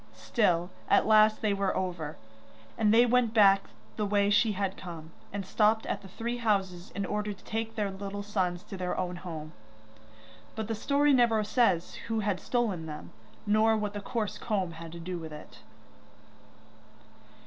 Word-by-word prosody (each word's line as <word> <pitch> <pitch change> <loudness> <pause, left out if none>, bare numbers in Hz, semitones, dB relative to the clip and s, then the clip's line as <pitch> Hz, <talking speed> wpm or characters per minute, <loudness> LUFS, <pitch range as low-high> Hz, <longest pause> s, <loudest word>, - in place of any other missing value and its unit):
Still, 180 -6 +1 0.2
at 200 - +5
last 215 0 +5
they 210 -2 +2
were 195 -1 0
over, 175 -5 -3 0.6
and 210 -1 +3
they 235 +2 +6
went 240 -2 +2
back 195 -2 +6 0.3
the 210 - 0
way 205 0 +2
she 210 +1 +4
had 195 -1 -2
come, 165 -3 -9 0.2
and 200 -1 -4
stopped 215 +3 +2
at - - -3
the 195 - -11
three 235 +5 -4
houses 195 -6 -1
in 200 - -1
order 210 0 -2
to 195 - -19
take 225 0 -3
their 205 -3 -1
little 200 +1 -5
sons 185 -4 -1
to 195 - -8
their 180 -1 -2
own 180 -1 -2
home. 160 -3 -7 1.0
But 220 -1 -3
the 225 - -1
story 285 +6 +2
never 235 -4 +4
says 205 -6 +2
who 225 -1 0
had 200 -3 -1
stolen 210 -10 -1
them, 150 -1 -8 0.3
nor 215 +1 +4
what 210 -1 -2
the 205 - -5
coarse 215 0 -3
comb 195 -6 -1
had 165 0 -9
to 170 - -8
do 175 +1 -5
with 160 -1 -8
it. 150 0 -11
205 Hz, 175 wpm, -29 LUFS, 180-220 Hz, 1.0 s, they